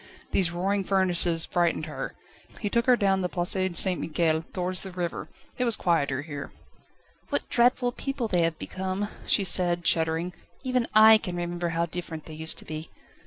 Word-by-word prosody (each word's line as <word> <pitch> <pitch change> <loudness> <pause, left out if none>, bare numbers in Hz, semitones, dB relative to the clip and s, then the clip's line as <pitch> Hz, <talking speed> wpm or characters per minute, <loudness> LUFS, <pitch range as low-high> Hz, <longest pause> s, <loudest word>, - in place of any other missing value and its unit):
These 185 -4 +2
roaring 195 +4 -1
furnaces 180 -3 +2
frightened 170 -3 0
her; 155 - -6 0.4
he 205 -3 -3
took 235 +2 +1
her 250 - +7
down 195 -4 +1
the 180 - -1
Place 175 0 0 0.3
St 185 -2 0
Michel, 160 0 +1
towards 185 0 -1
the 190 - -5
river. 175 -2 -4 0.3
It - - +2
was 235 -3 +7
quieter 145 -6 0
here. 145 -3 -7 0.8
"What - - -2
dreadful 245 +1 +3
people 275 -1 -3
they 180 -5 +1
have 165 -1 0
become," 190 +4 -3 0.2
she 200 - +3
said, 175 -2 +2
shuddering; 165 +2 +1 0.3
"even 255 -2 0
I 220 0 +8
can 180 -4 -5
remember 175 0 -3
how 170 0 0
different 165 -2 -7
they 160 - -9
used 160 +1 -2
to - - -5
be." 155 +1 -6
175 Hz, 175 wpm, -26 LUFS, 165-200 Hz, 0.8 s, I